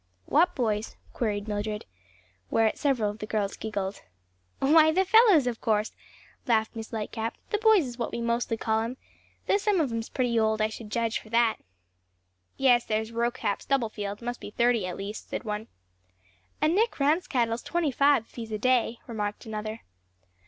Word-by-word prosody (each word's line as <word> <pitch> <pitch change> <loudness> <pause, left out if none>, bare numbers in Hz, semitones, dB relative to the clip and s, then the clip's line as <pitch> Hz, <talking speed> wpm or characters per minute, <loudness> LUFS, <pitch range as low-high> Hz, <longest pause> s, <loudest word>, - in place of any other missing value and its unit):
"What 345 +5 +3
boys?" 220 -3 -1 0.2
queried 210 -3 -2
Mildred; 210 0 -3 0.6
whereat 225 -1 +2
several 245 -8 +1
of 210 - -12
the 215 - -5
girls 210 -2 -1
giggled. 200 -3 -4 0.6
"Why 315 +3 +5
the 380 +4 +2
fellows, 400 - +6
of 240 -2 -3
course," 215 -1 +1 0.6
laughed 220 -2 +1
Miss 225 -1 -7
Lightcap; 225 +1 -3 0.2
"the 420 - +1
boys 435 -7 +5
is 245 -1 -8
what 235 - -2
we - - -4
mostly 235 0 0
call 220 0 0
'em; 230 +3 -3 0.5
though - - +3
some 410 -2 +1
of 285 -6 +1
'em's 230 0 -3
pretty 245 -3 +1
old, 220 0 +2
I 215 0 +2
should 220 0 -9
judge, 230 +1 0
for 215 - -16
that." 230 0 +3 1.0
"Yes, 245 -3 +4
there's 220 +1 -2
Rocap 235 -2 -1
Stubblefield, 215 -5 -2
must 245 +1 -4
be - - -7
thirty 235 -3 +2
at 180 - -5
least," 200 +2 -6
said - - -4
one. 210 0 -4 0.9
"And 310 +2 +2
Nick 445 +4 +2
Ransquattle's 265 -6 +1
twenty 340 -4 -1
five 280 -2 +4
if - - -27
he's 225 -2 -7
a 215 - -1
day," 245 0 +2
remarked 210 -3 -4
another. 215 0 -5
230 Hz, 175 wpm, -27 LUFS, 215-265 Hz, 1.0 s, fellows